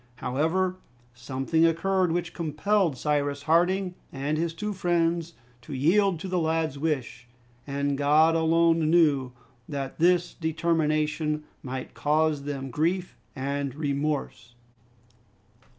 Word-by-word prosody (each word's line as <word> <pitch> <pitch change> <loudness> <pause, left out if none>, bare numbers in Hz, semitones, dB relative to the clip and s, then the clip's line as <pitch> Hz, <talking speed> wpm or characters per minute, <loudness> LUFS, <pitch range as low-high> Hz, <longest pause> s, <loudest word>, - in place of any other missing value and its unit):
However, 160 +10 0 0.4
something 135 +6 -1
occurred 180 +2 +2
which 175 0 -2
compelled 170 0 0
Cyrus 145 0 -1
Harding 180 +3 +2 0.2
and 140 +3 -2
his 165 +1 -1
two 210 +5 -3
friends 170 -2 0 0.3
to 140 +4 -7
yield 175 +6 +3
to - - -5
the 180 -1 0
lad's 160 -3 -1
wish, 135 -6 -3 0.4
and 140 0 -1
God 150 +3 +4
alone 165 0 +3
knew 150 -6 +3 0.4
that 140 -1 -5
this 175 +1 +3
determination 155 -2 0 0.2
might 130 0 -6
cause 150 -1 +1
them 135 -2 -4
grief 175 +7 -1 0.2
and 140 0 -3
remorse. 140 -5 -3
155 Hz, 115 wpm, -26 LUFS, 140-170 Hz, 0.4 s, God